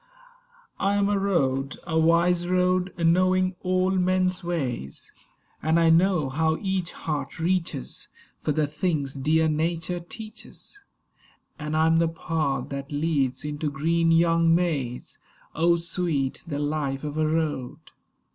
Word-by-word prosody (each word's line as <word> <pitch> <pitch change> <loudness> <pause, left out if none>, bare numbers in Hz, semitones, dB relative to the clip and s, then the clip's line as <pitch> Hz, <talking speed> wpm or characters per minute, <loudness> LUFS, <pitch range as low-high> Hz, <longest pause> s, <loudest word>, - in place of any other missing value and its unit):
I 200 +1 +1
am 200 0 +2
a 205 -1 +1
Road; 135 -9 0
a 160 -1 0
wise 170 +2 +3
road, 180 0 +2
knowing 185 +2 +3
all 185 +1 +1
men's 185 0 +1
ways; 130 - -3 0.5
And 160 +2 +2
I 165 -1 +5
know 175 -3 +3
how 160 +4 +1
each 190 -3 -2
heart 150 -1 -4
reaches 165 - -2 0.3
For 155 - -1
the 150 +1 +1
things 150 -2 -1
dear 155 +4 +2
Nature 165 +3 -1
teaches; 220 - -10 0.8
And 150 0 -2
I 160 - +4
am 160 0 +4
the 165 0 +3
path 160 -3 -2
that 140 0 -6
leads 145 -3 0
into 150 0 -2
green 165 +4 +1
young 165 0 +4
Mays. 145 -9 -2 0.3
Oh, 170 +2 +3
sweet 165 -5 -2
the 145 -3 -3
life 145 -2 -2
of 150 -1 -4
a 155 0 +1
Road! 150 -4 -1
165 Hz, 135 wpm, -25 LUFS, 150-180 Hz, 0.8 s, I